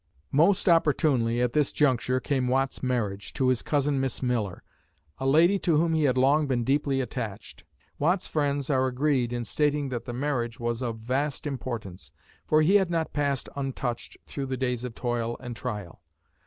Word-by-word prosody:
Most 180 +8 +3
opportunely, 140 -8 +3
at 125 - +1
this 150 +1 +1
juncture, 130 -3 +2
came 130 -2 -1
Watt's 135 +1 0
marriage, 105 -6 -2
to 130 -1 +1
his 130 -2 +1
cousin 145 -1 0
Miss 135 0 -1
Miller, 115 -7 -1 0.6
a 135 - -1
lady 170 +8 +5
to 170 -5 +2
whom 165 +1 +2
he 155 -2 +2
had 130 -2 +2
long 140 +4 +3
been 125 -3 0
deeply 135 +1 +1
attached. 110 -4 -6 0.4
Watt's 175 +5 +2
friends 145 -2 -1
are 130 -1 +2
agreed 130 -2 +1
in 120 -1 -3
stating 145 +2 +1
that 120 -2 -4
the - - -5
marriage 120 -3 -2
was 120 0 -2
of 115 -3 -2
vast 130 +7 -2
importance, 120 -9 -5 0.4
for 155 0 +4
he 190 +6 +6
had 190 -3 +1
not 165 -2 -1
passed 140 -3 -1
untouched 135 -3 -4
through 140 -2 -5
the 130 0 -3
days 125 -2 -1
of 125 -3 -6
toil 120 -1 -2
and 120 -2 -7
trial. 105 -8 -6
130 Hz, 180 wpm, -27 LUFS, 120-145 Hz, 0.6 s, he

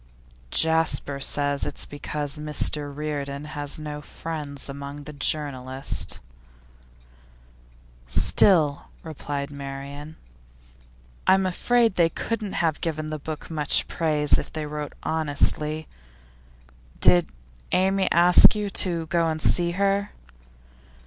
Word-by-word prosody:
'Jasper 160 - +1
says 145 +1 0
it's - - -3
because 145 0 -4
Mr 150 -1 0
Reardon 145 -1 -5
has 145 -2 -3
no 150 -1 -6
friends 150 -3 -6
among 140 +1 -7
the 150 - -9
journalists.' 135 -3 0 1.9
'Still,' 140 - +4 0.2
replied 145 -2 -5
Marian, 140 +2 -8 1.1
'I'm 190 0 +4
afraid 230 +4 +1
they 170 -2 +4
couldn't 215 +3 -4
have 160 -3 -1
given 155 -2 -3
the 155 - -4
book 155 +2 -7
much 150 -3 +1
praise, 150 -3 +3
if - - -8
they 155 -1 -4
wrote 150 0 -6
honestly. 155 0 +1 1.1
Did 90 -1 +5 0.4
Amy 190 +1 +2
ask 175 +4 +7
you 205 -1 -3
to 170 -4 +1
go 170 0 +1
and 160 0 -3
see 175 +2 +2
her? 200 +2 0
150 Hz, 110 wpm, -24 LUFS, 145-165 Hz, 1.9 s, ask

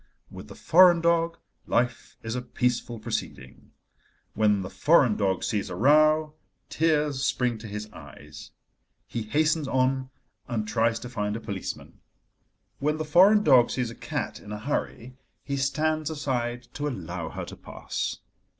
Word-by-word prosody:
With - - -10
the - - -11
foreign 175 0 +6
dog, 170 0 +1 0.3
life 120 0 -1
is 115 0 -4
a 125 - -2
peaceful 120 -1 -2
proceeding. 110 - -6 0.6
When 105 -2 +2
the 95 - -6
foreign 140 -8 +4
dog 95 -3 0
sees 105 -3 -2
a - - -5
row, 155 +3 +4 0.4
tears 150 -4 +1
spring 125 -4 0
to 110 - -9
his 105 +1 -6
eyes: - - -12 0.6
he 115 - -5
hastens 155 +6 +1
on 130 0 0 0.4
and 110 -3 -2
tries 115 +1 +1
to 125 - -6
find 105 -4 -3
a - - -4
policeman. 100 -4 -7 0.8
When 150 +2 0
the 155 - -3
foreign 195 +7 +5
dog 130 -7 +6
sees 125 -3 -2
a - - -10
cat - - -4
in 105 - -11
a 105 - -4
hurry, 130 0 -4 0.3
he 140 - -3
stands 155 +3 0
aside 125 -5 -2
to 145 +1 -3
allow 90 - -5
her - - -6
to - - -9
pass. - - -5
130 Hz, 155 wpm, -26 LUFS, 115-155 Hz, 0.8 s, foreign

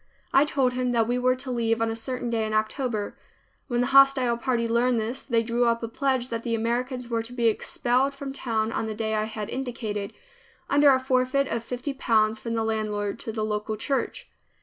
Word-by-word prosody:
I 275 - +6
told 265 -4 +1
him 250 0 0
that 230 -2 +2
we 245 +1 0
were 255 0 +3
to 255 0 -6
leave 230 -2 +1
on 225 0 +1
a - - -3
certain 245 +1 -3
day 225 -1 +1
in 215 - -2
October. 215 0 -1 0.5
When 240 -3 0
the - - +2
hostile 270 -3 +6
party 235 -1 0
learned 235 +1 +2
this, 230 +5 -3
they 230 -3 +1
drew 235 +1 +1
up 230 0 +1
a - - -1
pledge 260 +1 -1
that 230 -1 -3
the 230 0 -1
Americans 245 +2 -2
were 230 -1 -1
to 225 +2 -8
be 240 -1 -1
expelled 250 +4 +1
from 275 -1 -6
town 225 -4 -1
on 225 - -2
the 215 - -4
day 220 0 -2
I 215 0 +1
had 215 -1 -5
indicated, 220 -6 -4 0.6
under 285 +1 +6
a 260 -1 +5
forfeit 260 +1 +1
of 230 -1 -2
fifty 250 +4 -4
pounds 220 -4 +2
from 230 -1 -3
the 225 - 0
landlord 210 -2 -2
to 225 - -5
the 215 -1 -2
local 210 0 -2
church. 270 +5 -2
235 Hz, 215 wpm, -26 LUFS, 225-255 Hz, 0.6 s, I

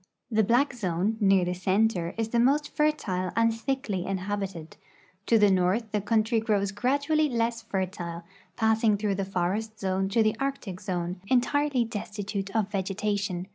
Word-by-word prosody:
The 220 0 +3
black 245 +7 +2
zone, 200 -1 -1
near 195 -3 +4
the 180 - -1
center, 185 -1 +1
is 225 -1 -1
the 235 - +1
most 280 +5 +2
fertile 200 -12 0
and 230 0 +3
thickly 225 -6 -2
inhabited. 195 -3 -4 0.5
To 230 - +5
the 205 -2 +5
north 190 +4 +1
the 210 - 0
country 220 +2 +2
grows 205 -3 0
gradually 285 +8 +1
less 230 -1 -1
fertile, 185 -5 -4 0.3
passing 220 -1 +3
through 205 -1 0
the 195 0 -2
forest 195 +4 -2
zone 190 0 0
to 225 +3 +3
the 215 0 +1
Arctic 270 -9 -3
zone, 180 -1 -3
entirel}' 260 0 +2
destitute 205 -2 -4
of 215 -3 +1
vegetation. 195 -1 -2
210 Hz, 155 wpm, -27 LUFS, 190-230 Hz, 0.5 s, To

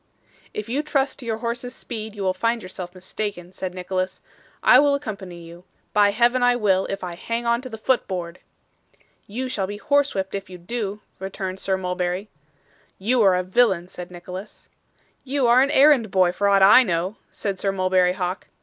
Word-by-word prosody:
'If 210 0 -5
you 260 +5 0
trust 275 -3 -1
to 245 - -8
your 220 -1 -1
horse's 245 +2 -3
speed, 220 -3 -6
you 200 - -4
will 185 -1 +2
find 230 +4 -1
yourself 185 -1 -8
mistaken,' 185 -1 -5
said 185 -1 -5
Nicholas. 185 0 -3 0.4
'I - - +8
will 285 -1 +4
accompany 195 -10 -6
you. 170 +1 -12 0.3
By 205 -1 +5
Heaven 240 +4 +2
I 245 0 +4
will, 195 -5 +2
if 195 -1 -4
I 180 -1 -4
hang 230 +7 -4
on 235 +1 +2
to 255 - -8
the 220 - -7
foot 250 +3 +1
board.' 175 -2 -5 0.9
'You 250 +6 -4
shall 200 -6 -2
be 205 +1 -5
horsewhipped 275 -7 0
if 195 -1 -5
you 180 - -9
do,' 205 +2 -4 0.2
returned 190 0 -5
Sir 190 -1 0
Mulberry. 180 +2 -2 0.7
'You 235 +5 +2
are 195 -3 +5
a 180 - 0
villain,' 185 -3 +2
said 180 -1 -8
Nicholas. 180 +3 -9 0.5
'You 275 0 0
are 240 +2 +6
an 275 - +3
errand 280 -6 +5
boy 185 -2 +3
for 200 +3 0
aught 195 -1 +5
I 205 +6 +9
know,' 185 -2 -1
said 195 -3 -4
Sir 195 - 0
Mulberry 185 -1 +2
Hawk. 185 0 -3
200 Hz, 190 wpm, -23 LUFS, 185-235 Hz, 0.9 s, I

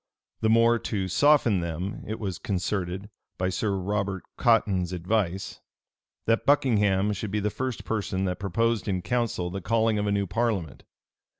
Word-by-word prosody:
The 110 - +1
more 115 +1 +5
to 100 -5 -2
soften 120 -1 +4
them, 85 +3 -4
it 110 +1 -4
was 95 -5 -4
concerted, 95 0 -2 0.3
by 90 0 0
Sir 100 +2 -1
Robert 100 0 -2
Cotton's 100 -7 +2
advice,[*] 95 +1 -1 0.6
that 115 0 +2
Buckingham 105 -8 +3
should 105 +1 -4
be 105 +2 -1
the 105 +1 -1
first 130 0 -4
person 95 -3 -1
that 90 0 -2
proposed 110 +3 0
in 95 -3 -1
council 115 -7 -1
the 95 +1 -4
calling 110 +1 +2
of 105 - -1
a - - +1
new 100 0 +1
parliament. 105 -6 -2
100 Hz, 160 wpm, -26 LUFS, 95-115 Hz, 0.6 s, more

